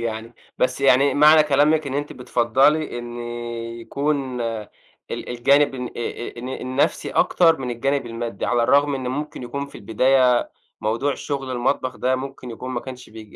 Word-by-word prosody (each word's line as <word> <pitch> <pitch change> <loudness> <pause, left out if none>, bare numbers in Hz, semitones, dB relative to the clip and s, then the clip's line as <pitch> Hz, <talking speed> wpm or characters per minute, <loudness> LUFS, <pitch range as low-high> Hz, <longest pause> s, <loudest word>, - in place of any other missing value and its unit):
يعني، 115 0 -4 0.2
بس 130 +1 +1
يعني 135 +1 +4
معنى 155 +1 +7
كلامِك 150 +1 +3
إن 135 - -4
أنتِ 145 +1 -3
بتفضّلي 130 +4 +1
إن 120 0 -7 0.6
يكون 135 +1 -2
ال 115 -3 -7
الجانب 140 +4 +3
الن 125 -1 -4
آآ - - -6
ال 120 0 -5
الن 125 +2 -6
النفسي 130 +1 -1
أكتر 165 -2 +3
من 125 -2 -3
الجانب 135 +2 -1
المادي، 115 -2 -4
على 120 -1 +2
الرغم 145 +3 +3
إن 130 -2 -3
ممكن 145 +1 -4
يكون 140 +3 -4
في 140 - -18
البداية 125 +2 +3 0.3
موضوع 115 +6 0
شغل 135 -2 -4
المطبخ 130 +1 -1
ده، 130 +1 +1
ممكن 130 -1 -7
يكون 125 +3 -7
ما - - -2
كانش 130 -2 -10
بيع 110 0 -10
130 Hz, 165 wpm, -22 LUFS, 120-140 Hz, 0.6 s, معنى